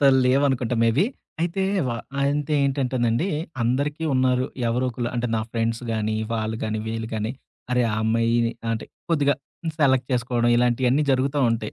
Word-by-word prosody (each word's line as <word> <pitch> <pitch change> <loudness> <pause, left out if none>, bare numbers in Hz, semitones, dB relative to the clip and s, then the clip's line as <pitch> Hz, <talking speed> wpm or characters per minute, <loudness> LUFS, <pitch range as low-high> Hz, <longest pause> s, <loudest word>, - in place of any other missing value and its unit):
అప్పుడంత 145 - +3 0.2
లేవనుకుంటా 130 -2 +2
maybe. 120 - +3 0.4
అయితే 175 +3 0 0.3
వ - - -1 0.3
అంత 145 +1 0
ఏంటంటేనండి 130 +2 +1 0.3
అందరికీ 145 +6 0
ఉన్నారు, 130 0 +2 0.2
ఎవరో 125 +2 +1
ఒకళ్ళు 120 +1 -3
అంటే 120 0 0
నా 110 - 0
ఫ్రెండ్స్ 115 +1 -1
గానీ, 110 0 -1 0.2
వాళ్ళు 110 0 -1
గానీ 110 0 -2
వీళ్ళు 110 0 -3
గానీ, 110 0 -2 0.4
అరే 125 0 +3
ఆ - - 0
అమ్మాయి 115 +1 +2 0.2
అంటే, 115 - -3 0.3
కొద్దిగా 145 -3 +3 0.4
సెలెక్ట్ 130 -3 +3
చేసుకోవడం 120 -1 +1
ఇలాంటియన్నీ 125 +3 +2
జరుగుతూ 135 +3 +1
ఉంటాయి. 110 -2 -2
125 Hz, 150 wpm, -24 LUFS, 115-135 Hz, 0.4 s, అప్పుడంత